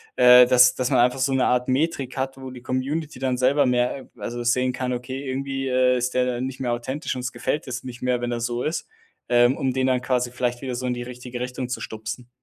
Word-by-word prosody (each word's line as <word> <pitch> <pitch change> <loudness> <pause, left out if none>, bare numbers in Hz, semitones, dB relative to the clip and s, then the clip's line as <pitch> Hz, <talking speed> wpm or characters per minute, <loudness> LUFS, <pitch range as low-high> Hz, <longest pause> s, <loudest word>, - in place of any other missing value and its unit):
äh, 125 0 +8
dass 125 0 +6
dass 130 -1 -1
man - - +3
einfach 125 +2 +3
so 135 +1 +1
'ne 130 -1 +2
Art 125 0 +1
Metrik 135 -1 -1
hat, 135 0 -2
wo 130 -1 -8
die 125 -1 -11
Community 140 +3 -3
dann 130 -1 0
selber 135 +2 +3
mehr 125 +2 0
also, 120 +3 -5
sehen 125 +2 +1
kann: 125 0 -2
„Okay, 130 +2 -5
irgendwie, 135 0 -3
äh, 125 0 +3
ist 125 +1 -2
der 125 0 +3
dann 125 0 -2
nicht 135 0 -8
mehr 125 -2 -1
authentisch. 130 +6 -3
Uns 125 0 -4
gefällt 135 +5 -3
es 130 0 -5
nicht 125 -2 -9
mehr, 125 -1 +1
wenn 120 0 -2
er 120 - -2
so 120 +1 -2
ist.“ 155 - -2 0.4
Äh, 120 0 +5
um 130 +1 -1
den 130 0 0
dann 130 -1 +1
quasi 125 -1 0
vielleicht 125 -1 -2
wieder 130 -1 -3
so 125 +1 -3
in 125 - -1
die 120 - -5
richtige 125 0 -8
Richtung 125 0 -4
zu 125 - -4
stupsen. 110 +3 -6
125 Hz, 245 wpm, -24 LUFS, 125-130 Hz, 0.4 s, äh